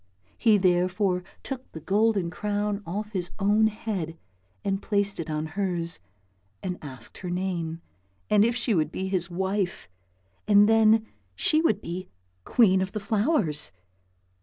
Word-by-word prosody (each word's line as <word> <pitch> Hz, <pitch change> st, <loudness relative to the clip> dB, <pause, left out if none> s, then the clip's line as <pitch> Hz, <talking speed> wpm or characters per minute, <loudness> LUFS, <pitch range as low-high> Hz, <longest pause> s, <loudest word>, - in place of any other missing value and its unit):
He 220 Hz, -3 st, +4 dB
therefore 180 Hz, 0 st, +2 dB, 0.2 s
took 265 Hz, -1 st, -6 dB
the 160 Hz, -, -6 dB
golden 200 Hz, +1 st, +1 dB
crown 205 Hz, +2 st, -2 dB
off 210 Hz, +5 st, -4 dB
his 180 Hz, -4 st, -1 dB
own 210 Hz, +2 st, +4 dB
head 200 Hz, -7 st, -4 dB, 0.5 s
and 195 Hz, 0 st, 0 dB
placed 200 Hz, -2 st, 0 dB
it 165 Hz, -, -4 dB
on 155 Hz, 0 st, -2 dB
hers, 170 Hz, -, -1 dB, 0.6 s
and 180 Hz, -1 st, -3 dB
asked 130 Hz, -6 st, -10 dB
her 180 Hz, -, -5 dB
name, 175 Hz, -3 st, -2 dB, 0.5 s
and 210 Hz, -1 st, +5 dB
if 235 Hz, +1 st, +2 dB
she 240 Hz, -1 st, 0 dB
would 155 Hz, -4 st, +1 dB
be 190 Hz, +1 st, -3 dB
his 180 Hz, -2 st, -1 dB
wife, 190 Hz, -, -2 dB, 0.6 s
and 205 Hz, 0 st, +6 dB
then 220 Hz, 0 st, +5 dB, 0.3 s
she 310 Hz, -, +3 dB
would 215 Hz, -, +2 dB
be 180 Hz, +2 st, -6 dB, 0.4 s
queen 190 Hz, -6 st, +4 dB
of 190 Hz, +1 st, -3 dB
the 215 Hz, -, -2 dB
flowers! 205 Hz, -, +1 dB
195 Hz, 145 wpm, -26 LUFS, 175-210 Hz, 0.6 s, and